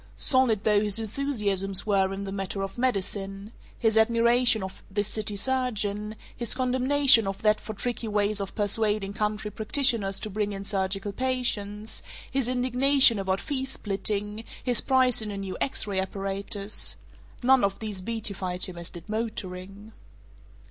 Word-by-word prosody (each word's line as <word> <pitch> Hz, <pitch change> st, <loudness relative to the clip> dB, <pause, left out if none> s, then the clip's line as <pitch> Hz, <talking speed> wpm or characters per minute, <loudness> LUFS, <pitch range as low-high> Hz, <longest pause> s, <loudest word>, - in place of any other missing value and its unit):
Solid 250 Hz, -6 st, +3 dB
though 210 Hz, -1 st, +3 dB
his 210 Hz, -1 st, +1 dB
enthusiasms 210 Hz, -5 st, +1 dB
were 195 Hz, -2 st, +2 dB
in 195 Hz, +1 st, -4 dB
the 195 Hz, -, -5 dB
matter 195 Hz, 0 st, -3 dB
of 195 Hz, -, -5 dB
medicine 200 Hz, -3 st, -2 dB, 0.3 s
his 220 Hz, -1 st, +3 dB
admiration 235 Hz, 0 st, +3 dB
of 190 Hz, -, -8 dB
this 205 Hz, +1 st, -1 dB
city 210 Hz, -1 st, -2 dB
surgeon, 215 Hz, -3 st, -1 dB, 0.2 s
his 235 Hz, -1 st, +1 dB
condemnation 255 Hz, -2 st, +4 dB
of 195 Hz, +1 st, -5 dB
that 215 Hz, 0 st, +3 dB
for 215 Hz, -, -7 dB
tricky 240 Hz, +1 st, -3 dB
ways 205 Hz, -1 st, 0 dB
of 195 Hz, -, -6 dB
persuading 205 Hz, -1 st, 0 dB
country 210 Hz, 0 st, -2 dB
practitioners 220 Hz, -3 st, +1 dB
to 215 Hz, -, -6 dB
bring 205 Hz, 0 st, -1 dB
in 195 Hz, 0 st, -6 dB
surgical 195 Hz, 0 st, -2 dB
patients, 220 Hz, -4 st, -2 dB, 0.3 s
his 270 Hz, -3 st, 0 dB
indignation 255 Hz, -1 st, +4 dB
about 190 Hz, 0 st, 0 dB
fee 275 Hz, -3 st, -2 dB
splitting, 210 Hz, -3 st, -3 dB, 0.2 s
his 245 Hz, -3 st, +2 dB
pride 255 Hz, -3 st, +3 dB
in 215 Hz, -, -5 dB
a 200 Hz, -, -5 dB
new 195 Hz, -1 st, -5 dB
X 270 Hz, -, 0 dB
ray 200 Hz, -2 st, -1 dB
apparatus 195 Hz, +1 st, -1 dB, 0.5 s
none 260 Hz, -1 st, +5 dB
of 195 Hz, 0 st, +1 dB
these 210 Hz, -4 st, -6 dB
beatified 195 Hz, -4 st, -2 dB
him 175 Hz, -2 st, -7 dB
as 170 Hz, -, -6 dB
did 175 Hz, 0 st, -11 dB
motoring. 205 Hz, -2 st, -5 dB
210 Hz, 155 wpm, -27 LUFS, 195-235 Hz, 0.5 s, none